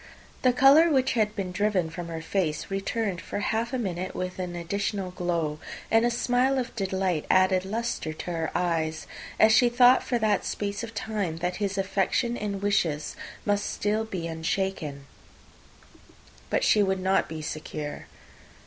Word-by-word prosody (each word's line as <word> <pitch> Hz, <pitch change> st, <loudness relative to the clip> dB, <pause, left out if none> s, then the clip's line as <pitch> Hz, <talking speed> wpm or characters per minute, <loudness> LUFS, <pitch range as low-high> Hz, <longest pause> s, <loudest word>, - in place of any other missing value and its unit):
The 255 Hz, -, +5 dB
colour 275 Hz, +6 st, +6 dB
which 265 Hz, -3 st, +2 dB
had 215 Hz, -2 st, +1 dB
been 190 Hz, -4 st, -3 dB
driven 185 Hz, -4 st, 0 dB
from 175 Hz, 0 st, -6 dB
her 165 Hz, -1 st, -5 dB
face 165 Hz, -3 st, -1 dB
returned 195 Hz, -1 st, -2 dB
for -, -, -5 dB
half 220 Hz, +3 st, -1 dB
a 260 Hz, -, -1 dB
minute 185 Hz, -5 st, -3 dB
with 185 Hz, 0 st, -4 dB
an 180 Hz, -1 st, -4 dB
additional 190 Hz, +2 st, -2 dB
glow, 170 Hz, -4 st, -2 dB, 0.3 s
and 225 Hz, 0 st, +5 dB
a 240 Hz, -, +3 dB
smile 245 Hz, +3 st, +1 dB
of 250 Hz, -2 st, -3 dB
delight 190 Hz, -5 st, -1 dB
added 185 Hz, 0 st, +4 dB
lustre 225 Hz, -5 st, -2 dB
to 155 Hz, +3 st, -6 dB
her 165 Hz, -2 st, -2 dB
eyes, 160 Hz, -3 st, -1 dB, 0.3 s
as 220 Hz, -, +7 dB
she 235 Hz, +2 st, +5 dB
thought 245 Hz, +1 st, +6 dB
for 245 Hz, -, -1 dB
that 215 Hz, -2 st, +1 dB
space 205 Hz, 0 st, -3 dB
of 230 Hz, -1 st, -7 dB
time 205 Hz, -6 st, -2 dB
that 180 Hz, +2 st, -2 dB
his 200 Hz, -1 st, -2 dB
affection 195 Hz, +5 st, 0 dB
and 200 Hz, -3 st, -4 dB
wishes 165 Hz, -7 st, 0 dB, 0.3 s
must 205 Hz, 0 st, +1 dB
still 210 Hz, +2 st, 0 dB
be 190 Hz, -6 st, -5 dB
unshaken; 160 Hz, -3 st, -3 dB, 1.4 s
but -, -, +1 dB
she 210 Hz, -, +4 dB
would 190 Hz, -1 st, +1 dB
not 190 Hz, +1 st, +1 dB
be 155 Hz, -1 st, -6 dB
secure. 150 Hz, -1 st, -5 dB
195 Hz, 165 wpm, -27 LUFS, 175-220 Hz, 1.4 s, as